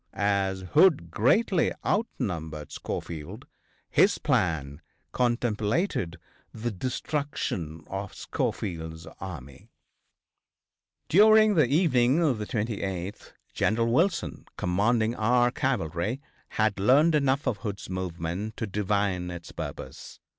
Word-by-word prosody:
As 100 -2 0
Hood 145 - +5
greatly 165 - +3
outnumbered 85 - -2
Schofield, 80 -3 -6 0.4
his - - +4
plan 75 -4 0 0.3
contemplated 120 - 0 0.3
the 115 +2 -3
destruction 105 - -3
of 95 0 -6
Schofield's 80 -2 -3
army. 70 -9 -9 1.4
During 215 +3 +6
the 155 -8 +4
evening 140 -1 +3
of 135 -8 +1
the 105 - -4
28th 100 -4 -4 0.2
General 115 +2 +1
Wilson, 170 +6 0
commanding 110 +5 +1
our 120 +2 +3
cavalry, 115 - -1 0.3
had 110 -2 0
learned 140 +11 +5
enough 140 -1 +2
of 125 -6 0
Hood's 100 -3 -5
movement 95 +3 -4
to - - -2
divine 100 -3 -1
its 85 -1 -8
purpose. - - -8
105 Hz, 100 wpm, -27 LUFS, 90-130 Hz, 1.4 s, During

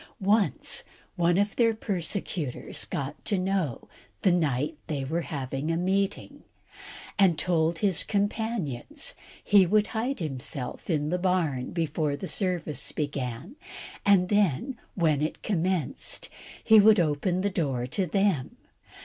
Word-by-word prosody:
Once, 205 +1 +1 0.3
one 175 -1 +2
of 205 +1 +1
their 230 -2 +3
persecutors 180 - -3
got 140 +1 -5
to 205 - +1
know 185 -8 -1 0.4
the 190 - +5
night 155 -3 0
they 140 -4 -2
were 165 +5 -1
having 140 -1 -4
a 165 - +1
meeting, 195 +3 -1 0.8
and 185 -5 +5
told 165 -1 +1
his 190 -2 +2
companions 205 - -2 0.3
he 200 -2 +6
would 210 +4 +3
hide 245 +5 -1
himself 135 -3 -4
in 150 -3 0
the 180 +2 0
barn 170 -9 0
before 155 -3 -1
the 185 - -6
service 175 - -1
began, 140 - -4 0.5
and 190 -3 +4
then 205 - +1 0.2
when 155 -5 +2
it 155 - -3
commenced 180 -5 -1 0.3
he 220 -1 +7
would 210 0 +7
open 170 +3 +1
the 200 +1 0
door 135 -9 -1
to 180 +9 0
them. 195 -6 0
175 Hz, 130 wpm, -27 LUFS, 150-200 Hz, 0.8 s, he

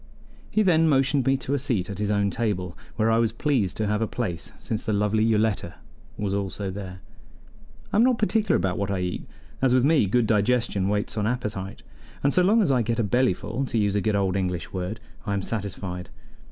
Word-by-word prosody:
He 215 - +2
then 165 -4 +4
motioned 135 -1 +2
me 135 0 +4
to 135 +1 -3
a 145 - +1
seat 120 -9 -1
at 100 0 -6
his 105 -1 0
own 100 -1 +1
table, 95 -6 -2 0.2
where 110 0 +2
I 115 - +3
was 115 -2 +2
pleased 115 - 0
to 110 - 0
have 105 +1 0
a 115 - +1
place 90 -10 -4
since 110 0 -3
the 110 - -2
lovely 105 +1 +2
Yoletta 110 -5 +1 0.4
was 100 -2 -2
also 100 0 -2
there. 95 -2 -7 0.9
I - - +3
am 225 - +6
not 250 -1 +3
particular 215 -2 +2
about 90 +1 0
what 100 -1 -1
I 100 - 0
eat, 90 0 -3 0.3
as 130 -1 +4
with 130 0 +4
me 145 -8 +4
good 120 +4 +2
digestion 105 -2 +1
waits 105 +1 -1
on 105 0 +1
appetite, 105 -5 -4 0.4
and 140 - +3
so 180 - +4
long 210 +5 +4
as 155 - +2
I 125 -2 +3
get 115 0 -1
a 120 - +1
bellyful 120 +3 0
to 115 - -2
use 105 -2 +2
a 105 - +2
good 105 +1 +1
old 95 -2 +1
English 90 -3 -2
word 95 +4 -3 0.3
I 100 - 0
am 100 - -2
satisfied. 95 -4 -4
110 Hz, 220 wpm, -25 LUFS, 100-125 Hz, 0.9 s, am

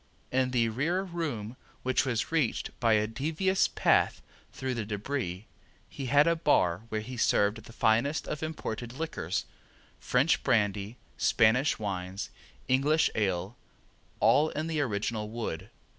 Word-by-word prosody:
In 130 0 +2
the 120 -3 +2
rear 160 - 0
room, 145 - -4 0.3
which 130 +2 +2
was 120 +1 -1
reached 155 -8 0
by 115 -2 +3
a 105 0 +3
devious 160 - +1
path - - +2 0.3
through 130 -1 -3
the 115 -3 -2
debris, 105 -2 -3 0.4
he 135 - -6
had 145 +4 +5
a 170 0 +3
bar 95 - +2
where 110 -1 -2
he 125 +3 -7
served 105 -1 +2
the - - -12
finest 115 +6 +1
of 150 - -4
imported 125 -7 -4
liquors, 160 +4 -3 0.5
French 130 +6 +2
brandy, 105 -1 +1 0.2
Spanish 125 +6 +3
wines, 95 -2 -4 0.4
English 145 +5 +3
ale, 95 0 -1 0.6
all 155 +2 +4
in 155 - -3
the 160 -2 -1
original 105 -3 -2
wood. 105 -5 -5
120 Hz, 140 wpm, -29 LUFS, 105-145 Hz, 0.6 s, had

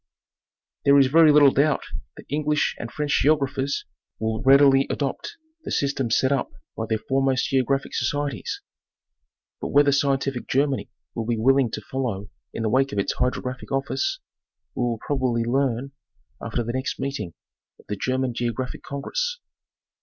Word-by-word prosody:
There 140 0 +6
is 140 - +7
very 155 +3 +6
little 145 -2 +7
doubt 145 +2 +2 0.3
that - - -11
English 150 +1 0
and 115 - -6
French 150 -1 0
geographers 140 -1 +1 0.3
will 110 0 -2
readily 135 0 +6
adopt 140 -2 -3 0.3
the - - -6
systems 135 -4 +1
set 130 - +2
up 135 -3 0 0.3
by 110 - -3
their 110 - +1
foremost 135 +2 0
geographic 135 +1 0
societies; 145 +3 -2 1.0
but - - -2
whether 145 0 +4
scientific 135 -2 0
Germany 140 0 0 0.2
will 115 -1 -4
be 120 -1 0
willing 135 +2 +3
to - - -5
follow 110 -6 -4 0.2
in 115 - -4
the 110 - +1
wake 135 +4 +2
of 105 - -5
its 100 - 0
Hydrographic 125 0 -3
Office, 265 - -1 0.5
we - - -4
will 120 -2 0
probably 130 -5 0
learn 130 +1 0 0.5
after 120 - -2
the 120 +1 -4
next 130 +1 -3
meeting 135 - -4 0.4
of - - -20
the 105 - -3
German 130 +4 -1
Geographic 120 +2 -3
Congress. 485 - -3
135 Hz, 155 wpm, -24 LUFS, 120-140 Hz, 1.0 s, is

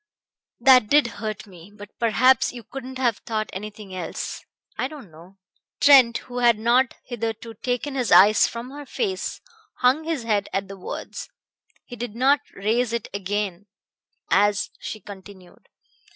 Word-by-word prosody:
That 255 -2 +6
did 290 +4 +5 0.2
hurt 215 -1 -4
me; 180 -1 -15
but 205 0 -13
perhaps 255 +3 +3
you 240 -2 -10
couldn't 260 +3 -8
have 240 -5 +1
thought 215 -2 -4
anything 210 0 -8
else 180 -3 -5 0.3
I 255 - -1
don't 275 - -12
know." 170 +5 -16 0.4
Trent, 265 -5 +7
who 245 -1 -5
had 240 -2 +4
not 240 +3 +2
hitherto 230 -1 -5
taken 250 +5 -3
his 255 -4 -1
eyes 205 +4 +7
from 235 +2 -7
her 290 0 -9
face, 390 - -3 0.4
hung 260 +5 +3
his 320 -7 -2
head 210 -3 0
at 195 0 -1
the 195 - -8
words. - - -7 0.6
He 245 - -9
did 235 -2 -6
not 270 +4 +4 0.2
raise 230 +4 0
it 235 -2 -3
again 200 -1 -3 0.6
as 205 0 +2
she 215 - -6
continued. 190 -2 -14
230 Hz, 150 wpm, -23 LUFS, 205-255 Hz, 0.6 s, Trent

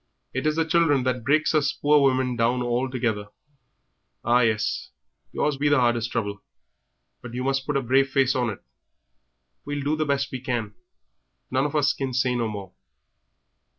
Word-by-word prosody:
It 130 +3 -1
is 155 - +1
the 165 0 +1
children 160 -5 +3
that 125 -2 -1
breaks 155 +6 +2
us 150 -3 +2
poor 145 0 +3
women 130 -2 +2
down 120 +2 +1
altogether. 120 -4 -1 1.0
Ah, 120 +1 +4
well, 110 -2 +2 0.7
yours 150 -2 0
be 145 +1 +1
the 145 -2 +4
hardest 120 -1 +1
trouble, 100 -4 -3 0.8
but 120 0 -9
you 125 - -2
must 135 0 -1
put 145 -1 +1
a 135 - -1
brave 135 +3 +3
face 135 -1 +2
on 125 -2 0
it; 105 - -7 1.0
we'll 145 -1 -4
do 145 +2 +1
the 155 -1 -1
best 140 -1 0
we 130 - -4
can; 120 -5 -3 0.8
none 130 +2 +1
of 150 - -7
us 145 -2 +3
can 135 -2 -4
say 125 0 +1
no 120 -2 0
more." 100 -4 -7
130 Hz, 175 wpm, -24 LUFS, 120-140 Hz, 1.0 s, Ah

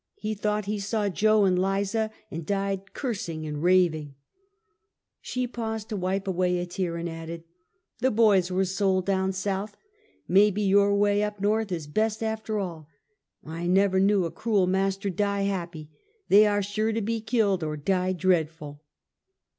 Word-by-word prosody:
He 215 0 -3
thought 210 0 -1
he 210 +1 -2
saw 205 +1 -1
Jo 215 +3 +3
and 180 -1 +2
Liza, 200 +3 0 0.2
and 165 - -5
died 195 +2 -2
cursing 180 - -4
and 150 -1 -4
raving," 165 -5 +2 1.1
She 250 0 -2
paused 225 -3 -5
to 215 - -3
wipe 190 +1 -2
away 180 -1 +1
a 175 - -2
tear, 175 -1 -3
and 170 +1 -3
added: 165 0 -7 0.3
" 360 0 -50
The 260 - +3
boys 210 -6 +3
were 185 +1 +1
sold 190 -1 0
down 190 -1 +1
South. 195 +2 -3 0.5
Maybe 205 +2 +4
your 200 +1 +4
way, 205 0 +2
up 210 -1 -3
Korth, 210 +1 0
is 165 -4 -3
best, 215 +8 -1
after 220 -1 -2
all. 170 -6 -5 0.6
I 165 +2 -5
never 190 +1 +3
knew 195 -1 +3
a 165 - -4
cruel 210 -5 +1
master 195 +1 0
die 200 +1 0
happy. 175 -5 -3 0.4
They 210 +2 +7
are 205 -1 +1
sure 215 +3 -1
to 225 - -1
be 225 +1 -2
killed, 215 -6 +1
or 155 -1 -3
die 185 +4 0
dread 180 -3 +2
ful!" 150 -2 -11
195 Hz, 170 wpm, -26 LUFS, 180-210 Hz, 1.1 s, They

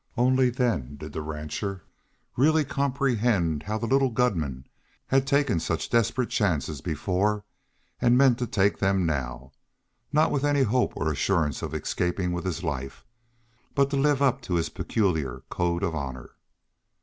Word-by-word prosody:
Only 130 +1 +4
then 115 - -1
did 75 +1 -9
the 80 - -3
rancher 80 +5 -5 0.5
really 155 +4 +3
comprehend 120 - +1
how 105 +6 -3
the 110 - -3
little 135 +2 +3
gunman 80 - -1 0.4
had 135 0 +2
taken 140 - +2
such - - -2
desperate 120 +2 +1
chances 80 -8 0
before, 95 +6 -1 0.6
and 120 +1 +4
meant 130 -3 +5
to 120 - -1
take 100 -1 +1
them 95 -2 +2
now, 65 -4 -3 0.6
not 155 +1 +3
with 140 - 0
any 145 -1 +3
hope 125 +2 +1
or 80 +2 0
assurance 75 -2 0
of - - -4
escaping 90 0 -1
with 90 +1 -3
his 90 -1 -3
life, 70 -5 -4 0.7
but 140 0 +3
to - - 0
live 140 0 +2
up 135 -3 +2
to 90 - -2
his 85 -1 0
peculiar 80 - -1
code 85 +1 0
of 85 -4 0
honor. 65 -5 -5
100 Hz, 155 wpm, -26 LUFS, 80-130 Hz, 0.7 s, meant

